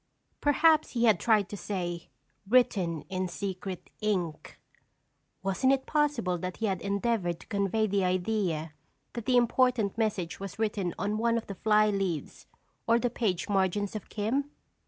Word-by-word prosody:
Perhaps 310 +2 +4
he 235 -2 0
had 220 -7 +5
tried 215 -4 +3
to 205 - -5
say: 175 -3 -4 0.4
"Written 190 -10 +2
in 185 -1 -3
secret 185 0 -5
ink." 180 -7 -2 0.8
Wasn't 195 +7 +2
it 270 -1 +1
possible 295 - 0
that 185 +1 -5
he 225 - -1
had 190 -3 -1
endeavored 200 -3 -1
to - - -13
convey 200 +1 0
the 200 -2 +1
idea 180 -4 -1 0.4
that 235 -2 -6
the 255 -1 +4
important 240 -3 +2
message 200 -6 -1
was 195 -2 -7
written 205 -5 -1
on 205 +2 -1
one 235 0 +2
of 230 - -3
the 200 - -6
fly 215 +2 +3
leaves 190 -6 -3 0.4
or 230 0 +5
the 240 0 0
page 195 -8 -1
margins 200 +1 0
of 215 - -6
"Kim"? 250 +7 -1
205 Hz, 155 wpm, -29 LUFS, 185-230 Hz, 0.8 s, had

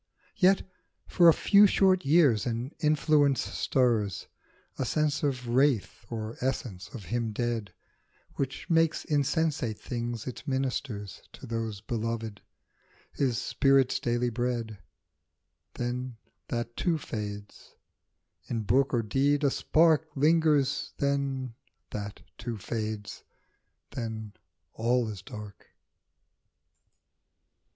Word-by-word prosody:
Yet 190 0 +4 0.4
for 170 -1 +6
a - - +7
few 205 0 +6
short 190 -1 +3
years 140 -7 +4
an 120 +4 -3
influence 150 -2 +3
stirs, 115 -8 0 0.5
A - - +1
sense 150 +3 0
or 145 - +4
wraith 125 -4 0
or 110 -1 -5
essence 120 -8 -3
of 105 -6 -8
him 115 +4 -2
dead, 115 -4 -2 0.6
Which 135 -1 -4
makes 165 -1 +2
insensate 145 -5 0
things 120 -2 -4
its 130 +4 -7
ministers 130 - -3
To - - -10
those 115 -3 -4
beloved, 115 -1 -3 0.7
his 130 -5 0
spirit's 135 +1 +2
daily 120 0 0
bread; 115 -3 -2 1.0
Then 125 0 -3 0.3
that, 120 -1 -3
too, 175 -3 +1
fades; 105 -7 -7 0.7
in 115 -2 -2
book 135 +5 +2
or 115 - +1
deed 140 +6 +1
a 140 - +3
spark 160 +1 +3
Lingers, 150 -2 +2
then 140 -3 -1 0.4
that, 105 -1 -6 0.2
too, 120 -2 -4
fa^des; 110 0 -4 0.7
then 110 -3 -5 0.4
all 120 +1 +1
is 100 -3 -7
dark. 105 0 -10
125 Hz, 110 wpm, -29 LUFS, 110-140 Hz, 1.0 s, a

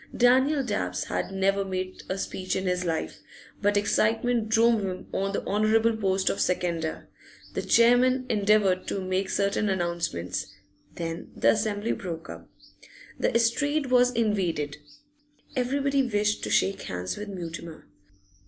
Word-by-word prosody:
Daniel 260 +4 +4
Dabbs 90 - -2
had - - -3
never 195 +1 +1
made 185 -1 -4
a 190 - -1
speech 185 -1 -3
in 190 - -2
his 180 0 0
life, 165 -2 -3 0.4
but 205 0 +2
excitement 225 +2 +1
drove 225 0 +4
him 185 -1 -4
on 195 +1 -1
the 200 - -3
honourable 220 +2 +2
post 195 -3 0
of - - -2
seconder. 170 -3 -1 0.5
The - - -2
chairman 250 +2 +4
endeavoured 205 -4 +2
to - - -2
make 190 +1 -1
certain 200 +1 0
announcements; 170 - -2 0.5
then 165 0 -5
the - - +4
assembly 215 0 -1
broke 165 -3 -5
up. - - -11 0.7
The - - +1
estrade 270 +5 +1
was 250 0 +5
invaded; 185 -11 0 0.8
everybody 275 +2 +1
wished 210 -4 0
to - - -4
shake 195 - +2
hands 90 0 -4
with 210 0 -6
Mutimer. 170 -3 -7
200 Hz, 140 wpm, -27 LUFS, 185-230 Hz, 0.8 s, was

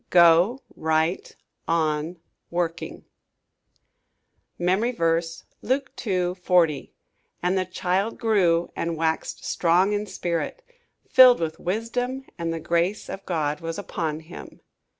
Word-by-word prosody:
Go 175 +8 +5
Right 160 +3 0 0.3
On 160 +1 0 0.3
Working 170 -1 -3 1.5
MEMORY 190 +8 +1
VERSE, 165 -3 0 0.2
Luke 265 +4 -1
2: 180 -4 -1
40 170 -6 +2 0.5
"And 180 +2 +2
the 185 -1 +1
child 185 +4 -1
grew, 185 -8 +2
and 165 -1 -2
waxed 160 0 -2
strong 180 +4 +2
in 205 0 -2
spirit, 185 - -3 0.4
filled 255 -1 +8
with 160 -1 -3
wisdom; 245 +7 -2
and 165 -1 -1
the 165 - -3
grace 170 +5 0
of 195 - -7
God 150 -4 -1
was 165 0 -4
upon 160 -6 -3
him." 160 +2 -11
175 Hz, 115 wpm, -25 LUFS, 165-205 Hz, 1.5 s, filled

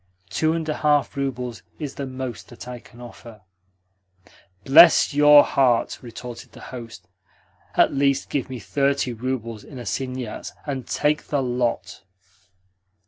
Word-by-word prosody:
Two 160 0 +1
and 165 -1 -3
a 155 - -2
half 145 -2 +2
roubles 125 -4 -4 0.2
is 145 -4 -5
the 140 - -5
most 130 -1 -6
that 120 0 -11
I 125 -1 -7
can 120 +1 -18
offer." 115 -2 -12 1.2
"Bless 160 +3 +7
your 145 0 +8
heart!" 125 -4 +1
retorted 120 0 -9
the - - -13
host. 115 -7 -9 0.7
"At - - +4
least 140 0 +1
give 135 -3 -2
me 130 - -5
thirty 140 +3 0
roubles 115 -2 -4
in 140 - -11
assignats, 125 +2 -5
and 135 -4 -4
take 150 +1 0
the 145 -2 0
lot." 120 -4 -2
130 Hz, 140 wpm, -23 LUFS, 120-140 Hz, 1.2 s, your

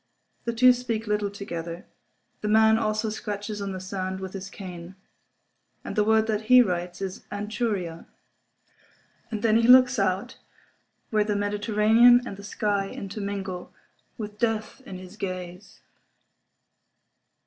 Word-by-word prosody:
The 235 - -1
two 250 +2 +6
speak 235 -3 -3
little 210 -1 0
together. 175 -4 -6 0.6
The 210 - -2
man 220 +1 +5
also 215 0 -1
scratches 210 -1 -5
on 200 -1 -3
the 185 - -5
sand 190 0 -4
with 190 -1 -7
his 190 -1 -6
cane. 180 -2 -9 0.9
And - - -6
the 210 - +3
word 220 +1 +3
that 215 -1 -2
he 250 0 +9
writes 175 -2 -3
is 190 -1 -4
"Anchuria." 205 -5 -3 1.2
And 220 -2 -4
then 225 -1 +4
he 230 0 +3
looks 255 -1 +7
out 195 +6 -1 0.7
where 215 -1 +3
the 210 0 -1
Mediterranean 215 +4 +4
and 200 - -6
the 200 - -11
sky 200 -1 -1
intermingle, 195 -2 -5 0.4
with 210 -2 -7
death 225 +1 -1
in 190 - -7
his 185 +2 -12
gaze. 185 -1 -7
205 Hz, 135 wpm, -26 LUFS, 190-220 Hz, 1.2 s, he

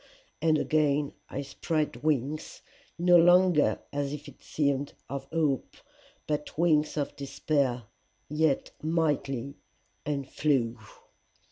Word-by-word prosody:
And 160 -1 +4
again 150 -2 +1 0.2
I 140 - -4
spread 155 +2 -2
wings 150 0 -1 0.3
no 175 +1 +6
longer 175 -2 +5 0.2
as 145 0 -2
it 150 0 -9
seemed 140 -1 -1
of 140 0 -5
hope, 150 -3 -1 0.5
but 150 -1 -3
wings 155 -2 +2
of 145 - -2
despair, 135 -2 -1 0.4
yet 150 -1 +1
mighty, 145 -5 -1 0.4
and 140 -3 -2
flew. 125 -6 0
150 Hz, 105 wpm, -28 LUFS, 140-155 Hz, 0.5 s, no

